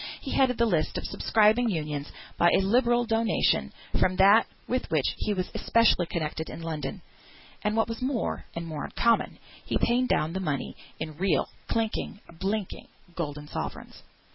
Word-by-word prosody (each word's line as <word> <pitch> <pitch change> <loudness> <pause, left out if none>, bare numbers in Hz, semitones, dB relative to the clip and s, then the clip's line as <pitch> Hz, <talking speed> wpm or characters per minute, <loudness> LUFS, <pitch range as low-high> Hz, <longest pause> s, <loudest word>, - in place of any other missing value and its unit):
He 270 - -6
headed 255 -2 +3
the 235 - +3
list 170 -8 0
of - - -4
subscribing 220 +2 +3
Unions, 150 -5 -3 0.2
by 175 - +4
a - - +3
liberal 240 +4 +3
donation 225 -1 +1 0.3
from 185 - +2
that 200 +4 +6 0.2
with 255 +1 -1
which 155 -4 +1
he 215 - -1
was 185 -2 -2
especially 230 -7 +3
connected 160 -1 -3
in 165 - -8
London; 160 -2 -4 0.6
and 210 +1 0
what 225 - +3
was 230 +1 -5
more, 255 -2 -2
and 170 0 -4
more 155 -3 -5
uncommon, 235 -1 +1 0.3
he - - 0
paid 245 +2 +2
down 155 -6 +1
the 190 - -2
money 150 -7 -2 0.2
in 155 -2 -5
real, 175 -6 +1 0.2
clinking, 220 -2 -2 0.2
blinking, 200 0 -3 0.3
golden 150 -3 -5
sovereigns! - - -6
195 Hz, 165 wpm, -27 LUFS, 160-230 Hz, 0.6 s, that